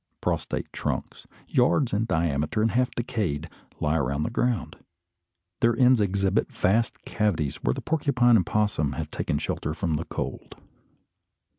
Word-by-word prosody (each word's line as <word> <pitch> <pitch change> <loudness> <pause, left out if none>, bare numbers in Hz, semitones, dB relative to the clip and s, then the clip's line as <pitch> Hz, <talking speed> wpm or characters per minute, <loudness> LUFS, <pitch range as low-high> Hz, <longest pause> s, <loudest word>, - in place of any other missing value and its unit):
Prostrate - - -2
trunks, - - -4 0.2
yards 125 0 +2
in 105 +2 +1
diameter 80 +1 0
and 115 - +2
half 125 +1 +2
decayed, 105 - -2 0.3
lie 75 +2 +1
along 70 0 0
the - - -2
ground. 120 - -1 0.8
Their 115 0 +3
ends 125 -2 +5
exhibit 100 +1 +1
vast 115 +5 0
cavities 85 -10 0
where - - 0
the - - -5
porcupine 130 -6 +3
and 95 -6 +2
opossum 105 -9 +1
have 75 +2 -5
taken - - -1
shelter 75 +2 -3
from 80 -4 -1
the 85 - -4
cold. - - -5
105 Hz, 145 wpm, -26 LUFS, 80-120 Hz, 0.8 s, ends